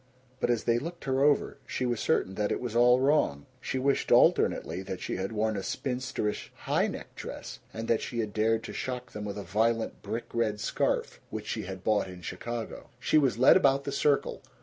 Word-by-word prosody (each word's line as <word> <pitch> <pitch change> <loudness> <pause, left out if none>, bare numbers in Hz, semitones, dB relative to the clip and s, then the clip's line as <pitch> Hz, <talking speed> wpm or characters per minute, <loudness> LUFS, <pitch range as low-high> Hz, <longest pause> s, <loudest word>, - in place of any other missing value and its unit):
But - - 0
as 120 -2 +1
they 120 0 +2
looked 170 +5 -7
her 135 -1 +1
over 145 -1 +2
she 130 - -2
was 120 -2 0
certain 95 - +1
that 105 +1 -1
it - - 0
was 120 -2 -4
all 125 +1 +6
wrong. 130 - +2
She 130 - -3
wished 135 +1 +1
alternately 85 +4 +4
that 95 -1 -5
she - - -3
had 95 +2 -3
worn 110 0 0
a 100 - -2
spinsterish 125 -2 -3
high - - 0
necked - - -8
dress, - - -7
and 115 +1 -5
that 115 - +2
she 120 - -5
had 110 -3 -2
dared 110 +1 +2
to - - -7
shock 125 -1 -4
them 105 0 -6
with 100 0 -4
a 100 - -4
violent 110 +5 0
brick 110 +3 -4
red 110 -3 0
scarf - - -1
which - - -5
she - - -3
had 95 0 -7
bought 105 -3 +2
in 90 -1 -10
Chicago. 120 +5 -5
She 155 - +3
was 135 -6 +2
led 130 - +7
about 140 -6 +4
the 140 - -3
circle. 140 0 +1
115 Hz, 215 wpm, -29 LUFS, 105-130 Hz, -, led